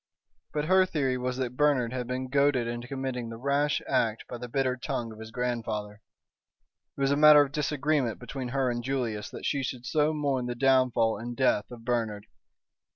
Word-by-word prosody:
But 150 0 -1
her 185 +3 +5
theory 135 -7 0
was 125 0 -2
that 125 -2 -3
Bernard 130 -4 +2
had 125 -2 -3
been 130 +1 -3
goaded 140 -2 +2
into 120 +1 -5
committing 130 -3 -4
the 115 - -7
rash 140 +3 0
act 115 -4 +1
by 120 - -7
the 125 0 -7
bitter 130 0 0
tongue 120 -2 -4
of 110 - -12
his 110 0 -8
grandfather. 110 -4 -3 1.0
It - - -5
was 135 0 +2
a - - +3
matter 150 0 +8
of 140 - -6
disagreement 145 -4 0
between 125 +1 -6
her 130 0 0
and 120 0 -3
Julius 115 -5 -2
that - - -8
she 140 - 0
should 125 -1 -5
so 150 +1 +2
mourn 140 -5 -1
the 120 - -3
downfall 125 -4 +3
and 120 +1 -6
death 130 -6 +2
of 115 -2 -11
Bernard. 110 -4 -1
125 Hz, 195 wpm, -28 LUFS, 120-140 Hz, 1.0 s, matter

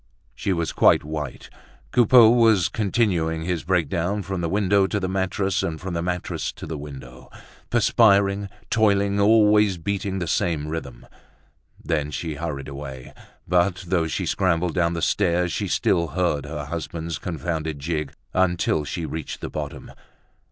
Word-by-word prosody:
She 100 +4 -2
was 85 -3 -1
quite - - +4
white. 75 -3 -6 0.4
Coupeau 120 -1 +7
was 110 -8 +4
continuing 90 -7 0
his 85 -1 -2
breakdown 90 +3 0
from 95 -2 -4
the 85 - -1
window 100 0 +2
to 105 - -1
the 95 - -2
mattress 95 0 -1
and 80 -1 -3
from 90 +2 -5
the 85 - -1
mattress 90 0 -3
to - - -9
the 80 - -5
window, 65 -4 -10 0.4
perspiring, 100 -4 +3 0.2
toiling, 100 -2 +2
always 105 -2 +4
beating 95 +2 -3
the 90 - -2
same 80 -2 -1
rhythm. 75 -6 -6 0.7
Then 75 -2 -1
she 75 +3 -4
hurried 75 -2 -5
away. 70 -2 -8 0.3
But 90 +1 +1
though 85 -3 +1
she - - -2
scrambled 90 -2 +1
down 85 -2 +1
the 85 - -3
stairs, 90 -3 +1
she - - -2
still 85 -1 +1
heard 75 -2 -1
her 75 -1 -5
husband's 80 +1 -5
confounded 80 -2 -3
jig 75 0 -3 0.2
until 90 -4 +1
she 85 +3 -4
reached 80 -2 -5
the - - -6
bottom. - - -6
85 Hz, 150 wpm, -23 LUFS, 80-100 Hz, 0.7 s, Coupeau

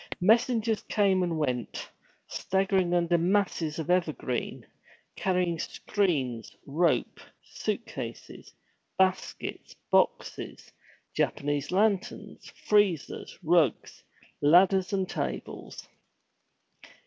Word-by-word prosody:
Messengers 225 +2 +3
came 195 -3 +3
and 170 -2 -1
went, 125 -7 -2 0.4
staggering 190 -2 0
under 170 0 +2
masses 175 -4 0
of 160 +1 -2
evergreen, 155 -8 -1 0.5
carrying 180 -3 0
screens, 145 - -1
rope, 150 -2 +1 0.2
suit - - -3
cases, - - -8 0.5
baskets, 190 0 -1 0.2
boxes, - - 0 0.4
Japanese 145 0 -1
lanterns, 200 0 -1 0.2
freezers, 205 -7 +1
rugs, 160 -6 +1 0.4
ladders, 185 +5 +5
and 190 -2 0
tables. 65 - -5
180 Hz, 80 wpm, -28 LUFS, 155-195 Hz, 0.5 s, ladders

